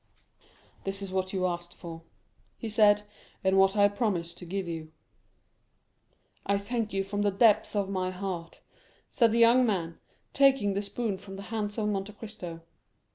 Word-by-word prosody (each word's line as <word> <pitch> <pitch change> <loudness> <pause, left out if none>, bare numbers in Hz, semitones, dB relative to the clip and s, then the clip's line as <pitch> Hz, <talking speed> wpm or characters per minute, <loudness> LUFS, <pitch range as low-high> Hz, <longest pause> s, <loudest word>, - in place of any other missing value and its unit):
"This 195 +1 -3
is 190 -1 -6
what 185 0 -1
you 185 -2 0
asked 175 -1 -3
for," 165 -2 -8 0.6
he 230 - -5
said, 210 -1 +5 0.4
"and 190 0 +3
what 195 +2 +4
I 205 0 +7
promised 195 -6 -2
to 180 - -9
give 190 +1 -3
you." 160 -2 -6 1.5
"I 200 - +1
thank 215 +2 -2
you 195 0 0
from 205 +1 -3
the 205 - +3
depths 215 +1 +3
of 200 -2 +1
my 185 -1 -1
heart," 185 -3 -5 0.5
said 235 -4 +3
the 230 - +1
young 235 +2 +6
man, 175 -8 -1 0.3
taking 270 -7 +4
the 200 - -1
spoon 205 -1 -3
from 195 0 -10
the 195 - -7
hands 210 -1 -2
of 215 -2 0
Monte 200 0 -2
Cristo. 200 -6 -8
200 Hz, 170 wpm, -29 LUFS, 185-210 Hz, 1.5 s, I